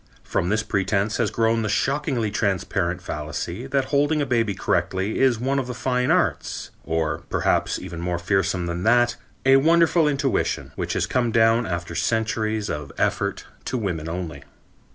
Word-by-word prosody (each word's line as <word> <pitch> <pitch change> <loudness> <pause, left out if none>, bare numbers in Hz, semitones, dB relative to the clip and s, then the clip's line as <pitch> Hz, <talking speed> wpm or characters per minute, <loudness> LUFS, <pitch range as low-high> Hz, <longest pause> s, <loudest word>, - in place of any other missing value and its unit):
From 85 - -1
this 110 +1 +1
pretense 100 +1 0
has - - +1
grown 115 0 +1
the 110 - -1
shockingly 130 -2 0
transparent 95 -3 -1
fallacy 85 - -4
that 135 -1 +1
holding 145 +2 +3
a 145 - +1
baby 115 -6 +1
correctly 95 +3 -1
is 130 -4 +3
one 135 +3 0
of 130 - -3
the 125 - -5
fine 125 +1 0
arts; - - 0
or, 80 -1 -1
perhaps - - +1
even 85 0 -7
more 90 0 -1
fearsome 95 0 0
than 85 0 -3
that, 120 +3 +3 0.3
a 135 0 +7
wonderful 165 +2 +4
intuition, 140 -2 0
which - - -2
has - - +1
come 120 -2 0
down 115 +1 +3
after 85 -1 -3
centuries 110 +3 0
of 75 -5 -4
effort - - -1 0.2
to 130 - -2
women 85 -8 -3
only. 85 -1 -5
110 Hz, 165 wpm, -23 LUFS, 90-125 Hz, 0.3 s, a